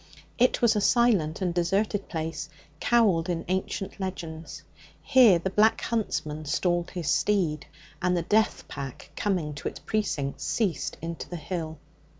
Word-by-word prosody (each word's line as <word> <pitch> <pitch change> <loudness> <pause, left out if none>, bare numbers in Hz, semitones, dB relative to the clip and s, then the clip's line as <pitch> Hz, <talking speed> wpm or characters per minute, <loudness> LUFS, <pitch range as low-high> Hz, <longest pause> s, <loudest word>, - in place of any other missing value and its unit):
It 250 0 +3
was 230 -2 +5
a 210 - +1
silent 200 -8 +3
and 180 -2 0
deserted 195 +4 0
place, 160 -2 -4 0.3
cowled 195 -8 +3
in 170 -2 -2
ancient 190 +2 -3
legends. 165 -4 -6 0.4
Here 250 -9 +6
the 180 +3 -3
Black 220 +2 +4
Huntsman 155 -9 -2
stalled 175 +3 0
his 175 -5 -5
steed, 165 -3 +1 0.3
and 180 0 +2
the 170 - 0
death 215 +5 +1
pack 135 -2 -7
coming 180 -7 -1
to 140 - -5
its - - -5
precincts, 155 -10 -2
ceased 200 -8 -1
into 165 0 -5
the 175 - -5
hill. 160 -1 -4
180 Hz, 150 wpm, -27 LUFS, 160-210 Hz, 0.4 s, Here